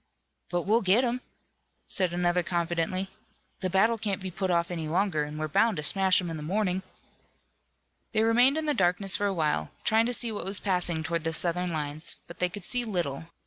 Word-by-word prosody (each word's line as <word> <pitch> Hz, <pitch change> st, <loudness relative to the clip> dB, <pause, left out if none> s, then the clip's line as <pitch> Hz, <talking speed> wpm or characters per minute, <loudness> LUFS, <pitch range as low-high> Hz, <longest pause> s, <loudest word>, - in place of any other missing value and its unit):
"But 175 Hz, -1 st, -1 dB
we'll 220 Hz, +4 st, +3 dB
get 200 Hz, +6 st, +3 dB
'em," 250 Hz, 0 st, -1 dB, 0.6 s
said 185 Hz, -3 st, -1 dB
another 175 Hz, 0 st, +1 dB
confidently. 175 Hz, +2 st, -2 dB, 0.5 s
"The 185 Hz, -, -1 dB
battle 220 Hz, +5 st, +3 dB
can't 205 Hz, -3 st, -1 dB
be 190 Hz, -1 st, -6 dB
put 190 Hz, +1 st, -2 dB
off 170 Hz, 0 st, +1 dB
any 165 Hz, -3 st, -3 dB
longer, 170 Hz, -2 st, +1 dB
and 150 Hz, +1 st, -7 dB
we're 155 Hz, 0 st, -2 dB
bound 220 Hz, +6 st, +2 dB
to 150 Hz, -, -3 dB
smash 190 Hz, +3 st, +4 dB
'em 175 Hz, -3 st, -4 dB
in 160 Hz, -, -4 dB
the -, -, -7 dB
morning." 185 Hz, +3 st, 0 dB, 1.3 s
They 220 Hz, -1 st, +2 dB
remained 245 Hz, +6 st, +5 dB
in 315 Hz, -, -1 dB
the 300 Hz, -, +2 dB
darkness 190 Hz, -1 st, +2 dB
for 205 Hz, -, +1 dB
a -, -, 0 dB
while, 150 Hz, -, 0 dB
trying 225 Hz, +1 st, +3 dB
to 245 Hz, -, -1 dB
see 235 Hz, -1 st, +2 dB
what 210 Hz, -, -4 dB
was 195 Hz, +1 st, -3 dB
passing 180 Hz, -4 st, 0 dB
toward 165 Hz, 0 st, -2 dB
the 165 Hz, 0 st, -1 dB
Southern 180 Hz, +1 st, +1 dB
lines, 155 Hz, 0 st, -3 dB
but 170 Hz, -, -12 dB
they 180 Hz, -, +2 dB
could 195 Hz, +1 st, -8 dB
see 245 Hz, +7 st, 0 dB
little. 175 Hz, -, -2 dB
180 Hz, 210 wpm, -28 LUFS, 170-205 Hz, 1.3 s, remained